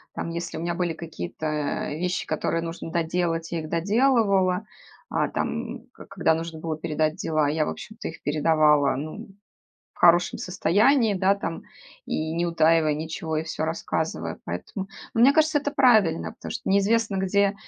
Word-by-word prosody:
Там, - - -3
если 170 0 -5
у - - -4
меня 170 +1 -1
были 175 -1 -1
какие-то 155 - -4
вещи, 175 +3 -2
которые 165 0 -1
нужно 165 0 -6
доделать, 165 0 -1
я 170 - -1
их 155 - -8
доделывала. 200 0 +2 0.4
А, - - 0
там, 235 +1 -3
когда 180 -4 0
нужно 165 0 -4
было 160 -1 -3
передать 155 0 -1
дела, 155 -4 0
я, 155 +1 +1
в - - -2
общем-то, 215 - -7
их 165 - -9
передавала, 150 -2 +3
ну, 155 - -6 0.7
в - - -23
хорошем 175 0 +5
состоянии, 210 - +3
да, 190 +1 +3
там, 165 -5 -5 0.4
и 155 0 -2
не 170 +1 0
утаивая 165 -2 +3
ничего, 160 +1 -4
и 155 - 0
всё 160 -1 -3
рассказывая. 160 - -3
Поэтому, 140 - -5 0.3
ну 225 - +1
мне 260 +4 +7
кажется, 315 -1 +4
это 290 0 -2
правильно. 220 - +3
Потому - - -8
что - - -4
неизвестно, 205 +2 +2
где 200 +1 +2
170 Hz, 165 wpm, -25 LUFS, 160-200 Hz, 0.7 s, мне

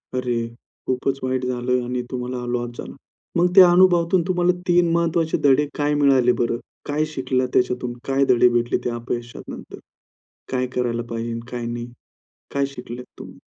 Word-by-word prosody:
अरे! 120 -2 -1 0.4
खूपच 130 +1 -1
वाईट 130 0 -1
झालं 125 0 0
आणि 125 +1 -2
तुम्हाला 125 -1 -4
लॉस 120 -1 -2
झाला. - - -8 0.4
मग 175 +1 +3
त्या 185 -2 +9
अनुभवातून 175 0 +4
तुम्हाला 180 -1 +2 0.2
3 175 -1 +4
महत्त्वाचे 165 -1 +1
धडे 145 +1 +5
काय 145 0 +1
मिळाले 135 -4 +4
बरं? 120 0 0 0.3
काय 150 +1 0
शिकला 130 -1 0
त्याच्यातून? 125 -1 0
काय 135 0 +2
धडे 125 0 +5
भेटले 120 0 +1
ते - - +1
अपयशानंतर? 120 0 -6 0.7
काय 125 -1 0
करायला 120 -1 0
पाहिजे, 115 0 -3
काय 120 -1 -4
नाही? 120 0 -4 0.7
काय 140 0 +1
शिकलेत 125 0 -8
तुम्ही? - - -10
125 Hz, 150 wpm, -22 LUFS, 120-150 Hz, 0.7 s, त्या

